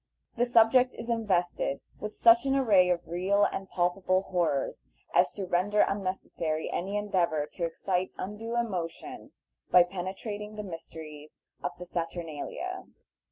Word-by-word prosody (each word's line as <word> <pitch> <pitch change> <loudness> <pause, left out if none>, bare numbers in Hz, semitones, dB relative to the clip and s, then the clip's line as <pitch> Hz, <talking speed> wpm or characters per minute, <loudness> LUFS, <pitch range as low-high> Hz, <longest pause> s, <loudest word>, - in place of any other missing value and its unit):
The 245 +1 +2
subject 245 +2 +5
is 235 +1 -4
invested 185 -10 0 0.2
with 210 - -5
such 235 +3 +6
an 270 - +2
array 205 -9 +5
of 175 -1 0
real 185 +4 +2
and 195 0 -3
palpable 185 +1 +1
horrors 170 -8 -1 0.3
as - - +4
to 195 - -4
render 190 +4 +2
unnecessary 185 -5 -1
any 195 +3 -2
endeavor 180 -7 +1
to 170 - -2
excite 180 +2 -1
undue 220 +4 -5
emotion 185 -9 -3 0.4
by 180 - +8
penetrating 195 +4 -5
the 210 - -5
mysteries 160 -4 -9 0.2
of 175 - -4
the 180 - -8
saturnalia. 170 - -4
185 Hz, 135 wpm, -29 LUFS, 175-210 Hz, 0.4 s, by